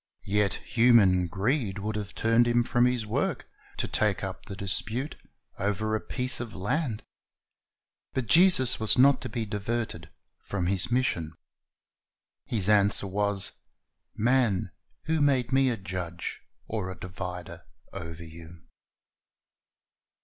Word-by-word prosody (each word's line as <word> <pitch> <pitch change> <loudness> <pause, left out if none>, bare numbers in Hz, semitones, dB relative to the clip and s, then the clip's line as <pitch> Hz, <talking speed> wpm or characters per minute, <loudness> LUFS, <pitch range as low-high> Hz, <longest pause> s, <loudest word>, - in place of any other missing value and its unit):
Yet 105 -1 +1
human 115 -7 +4
greed 105 - -1
would 105 +2 -3
have 105 -2 -5
turned 115 +1 +3
Him 120 0 +3
from 120 +1 +2
His 125 -3 -1
work, 105 - -2 0.3
to - - -1
take 105 -3 0
up 95 -1 -6
the 100 - -6
dispute 110 - -2 0.4
over 105 +2 -1
a 110 - -2
piece 130 +1 -2
of 120 -2 -6
land. 110 - -2 1.1
But 130 - -1
Jesus 160 - +5
was 110 +2 +3
not 140 +2 +5
to 130 - -5
be 110 +1 -3
diverted 105 -5 -3 0.3
from 95 -3 -3
His 95 +5 +1
mission. 120 -11 0 1.1
His 105 -5 -1
answer 100 -1 +5
was, 100 0 -1 0.6
"Man, 120 -4 +1 0.3
who 160 -1 0
made 135 -4 +2
Me 135 0 +4
a 120 - -1
judge 90 -3 -5 0.2
or 105 -4 -3
a 95 -2 -8
divider 90 -1 -7 0.3
over 85 0 -7
you?" 80 +1 -12
105 Hz, 130 wpm, -27 LUFS, 95-120 Hz, 1.1 s, Jesus